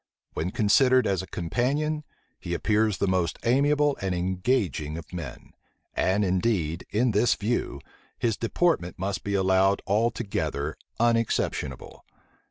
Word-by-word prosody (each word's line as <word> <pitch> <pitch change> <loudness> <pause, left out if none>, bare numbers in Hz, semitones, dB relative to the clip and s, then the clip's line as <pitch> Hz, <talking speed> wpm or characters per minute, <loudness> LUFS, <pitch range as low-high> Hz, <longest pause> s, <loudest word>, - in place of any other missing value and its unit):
When 85 - -2
considered 125 +6 +4
as 95 -2 +1
a 95 - -9
companion, 140 - -1 0.4
he 85 0 -3
appears 105 +1 +1
the - - +1
most 90 -3 0
amiable 145 +3 +3
and 95 -2 -1
engaging 90 - -1
of 85 +2 -10
men; 80 -9 -7 0.4
and 100 +2 +1
indeed, 90 -4 0
in 120 +3 +2
this 110 +3 +3
view, 115 +4 -2 0.4
his 115 -3 0
deportment 115 - 0
must 95 +1 -3
be 100 0 -1
allowed 95 +1 +3
altogether 100 -8 -1 0.2
unexceptionable. 115 - -1
100 Hz, 125 wpm, -26 LUFS, 90-120 Hz, 0.4 s, considered